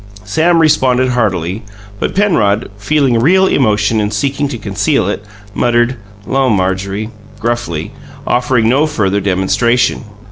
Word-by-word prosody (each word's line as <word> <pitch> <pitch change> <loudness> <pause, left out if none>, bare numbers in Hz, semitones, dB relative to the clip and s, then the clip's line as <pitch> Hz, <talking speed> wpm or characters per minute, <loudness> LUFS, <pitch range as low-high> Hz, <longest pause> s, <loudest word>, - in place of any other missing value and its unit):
Sam 160 +11 +1
responded 130 -5 +3
heartily; 100 -5 -1 0.4
but - - -2
Penrod, 115 - +1
feeling 125 +3 +1
real 185 +10 +4
emotion 110 - +1
and 105 0 -2
seeking 140 +7 -1
to 135 -4 -5
conceal 105 +3 0
it, 105 0 -3 0.3
muttered, 120 +3 +1 0.3
"'Lo, 135 -1 +1
Marjorie!" 100 +1 -1 0.3
gruffly, 115 -9 -3 0.3
offering 125 -2 +1
no 140 +6 +3
further 100 -9 0
demonstration. 100 +8 +1
115 Hz, 120 wpm, -14 LUFS, 100-135 Hz, 0.4 s, real